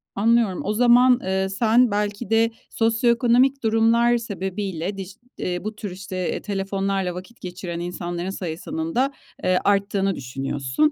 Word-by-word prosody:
Anlıyorum. 225 -2 +2
O 210 - -1
zaman, 245 +2 +5
eee, 190 0 0
sen 230 +4 +3
belki 205 +1 -2
de 225 +1 +3 0.2
sosyoekonomik 235 +3 +2
durumlar 230 +2 +3
sebebiyle 195 -3 -4
dij 190 0 -7 0.2
eee, 180 -1 -3
bu 215 +1 -4
tür 210 -2 -6
işte, 185 +1 -8
eee, - - -3
telefonlarla 195 -2 -2
vakit 185 +6 -10
geçiren 180 -1 -6
insanların 175 0 -4
sayısının 200 - -4
da, 270 +3 +2 0.3
eee, 185 0 +3
arttığını 200 -1 +1
düşünüyorsun. 135 - -1
200 Hz, 135 wpm, -23 LUFS, 185-235 Hz, 0.3 s, zaman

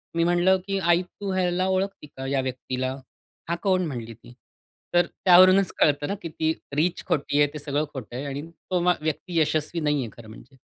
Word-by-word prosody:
मी 170 - +2
म्हणलं 175 +2 +3
की 195 0 0
"आई, 175 -1 +3
तू 195 +2 -6
ह्याला 185 0 +1
ओळखती 190 -4 -1
का 135 - -6
या 135 -1 +1
व्यक्तीला?" 130 0 -3 0.5
"हा 170 - +1
कोण?" 185 -2 +2
म्हणली 120 -6 -5
ती. 115 +2 -16 0.6
तर 175 -1 +5
त्यावरूनच 185 +2 +5
कळतं 145 -1 +3
ना, 200 - -2
की 165 - -5
ती 160 0 0 0.2
रिच 170 +4 0
खोटी 145 0 0
आहे 145 - +5
ते 150 - -6
सगळं 145 +1 -1
खोटं 120 -2 -7
आहे 135 - -4
आणि 140 0 -4
तो 180 +2 -3
मा 180 0 +4
व्यक्ती 160 +3 -2
यशस्वी 155 +2 0
नाहीये 145 -6 0
खरं 115 -2 -12
म्हणजे. 120 +4 -14
155 Hz, 195 wpm, -25 LUFS, 135-180 Hz, 0.6 s, तर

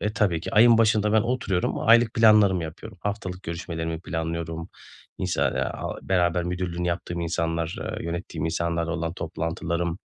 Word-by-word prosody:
e, 105 +1 -1
tabii 90 -8 +1
ki - - -5
ayın 115 +1 +7
başında 110 -1 +3
ben 110 - +5
oturuyorum, 115 -7 -1
o - - -4
aylık 115 0 +5
planlarımı 105 -5 +5
yapıyorum. 80 0 -8
Haftalık 100 -3 -4
görüşmelerimi 80 -1 -4
planlıyorum, 80 0 -4 0.5
insa - - -1
aaa, - - -2
beraber 90 -2 +1
müdürlüğünü 90 -1 -2
yaptığım 85 0 -3
insanlar, 85 0 -1
eee, - - -5
yönettiğim 85 -2 -4
insanlarla 85 0 -1
olan 85 -1 -2
toplantılarım 85 +1 -3
85 Hz, 150 wpm, -25 LUFS, 85-100 Hz, 0.5 s, ayın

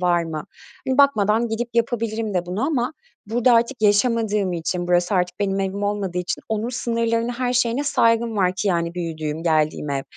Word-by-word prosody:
var 175 -1 +2
mı?" 155 -2 -5 0.4
Hani, 260 +1 0
bakmadan 230 -4 +3
gidip 230 +2 -2
yapabilirim 225 -3 -1
de 175 -1 0
bunu 185 +5 -3
ama 265 -3 0 0.3
burada 240 +3 +2
artık 235 +1 +1
yaşamadığım 210 -2 +2
için, 175 +1 -2
burası 175 +3 +2
artık 180 0 0
benim 195 -1 0
evim 195 +1 -3
olmadığı 205 -3 -2
için 180 - -3
onun 220 +1 -1
sınırlarına, 230 -1 -1
her 250 -1 0
şeyine 245 +3 +1
saygım 230 -4 +2
var 185 -2 +2
ki, 200 - 0
yani, 170 -2 0
büyüdüğüm, 160 -2 -4
geldiğim 155 -2 +1
ev. 135 -1 -1
210 Hz, 175 wpm, -22 LUFS, 180-230 Hz, 0.4 s, bakmadan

